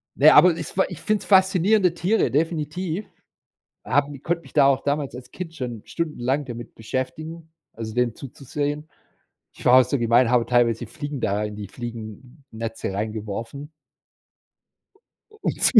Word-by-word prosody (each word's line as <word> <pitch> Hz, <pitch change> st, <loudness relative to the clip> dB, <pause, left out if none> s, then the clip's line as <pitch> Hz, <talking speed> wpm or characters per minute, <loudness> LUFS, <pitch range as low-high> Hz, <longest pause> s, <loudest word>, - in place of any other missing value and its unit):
ne, 150 Hz, +3 st, +7 dB
aber 180 Hz, -, +8 dB
ist 165 Hz, +2 st, -7 dB
wa 190 Hz, -, +5 dB
ich 180 Hz, -5 st, -8 dB
find's 215 Hz, +4 st, 0 dB
faszinierende 190 Hz, 0 st, +4 dB
Tiere, 185 Hz, +6 st, +1 dB
definitiv. 165 Hz, +5 st, -1 dB, 0.8 s
Haben 145 Hz, +2 st, +1 dB
ich 135 Hz, -, -14 dB
konnte 170 Hz, 0 st, -1 dB
mich -, -, -16 dB
da 145 Hz, -2 st, +5 dB
auch 135 Hz, -1 st, +3 dB
damals 145 Hz, -1 st, -1 dB
als 125 Hz, 0 st, -10 dB
Kind 175 Hz, -3 st, -7 dB
schon 120 Hz, -5 st, -5 dB
stundenlang 145 Hz, -4 st, -2 dB
damit 120 Hz, -2 st, -8 dB
beschäftigen, 155 Hz, +8 st, -5 dB, 0.2 s
also, 110 Hz, -1 st, -6 dB
denen 120 Hz, -1 st, +1 dB
zuzusehen. 145 Hz, +3 st, -4 dB, 0.7 s
Ich -, -, -13 dB
war 125 Hz, +1 st, +8 dB
auch -, -, +4 dB
so 130 Hz, +4 st, -1 dB
gemein, 120 Hz, +1 st, +4 dB
habe 120 Hz, -2 st, +3 dB
teilweise 120 Hz, -1 st, +2 dB
Fliegen 145 Hz, +4 st, -6 dB
da 105 Hz, -1 st, 0 dB
in 105 Hz, -1 st, -4 dB
die 105 Hz, -1 st, -6 dB
Fliegennetze 115 Hz, 0 st, -7 dB
reingeworfen 110 Hz, +7 st, -5 dB, 1.6 s
u 430 Hz, -, -18 dB
um -, -, +2 dB
zu -, -, +5 dB
135 Hz, 155 wpm, -24 LUFS, 115-160 Hz, 1.6 s, aber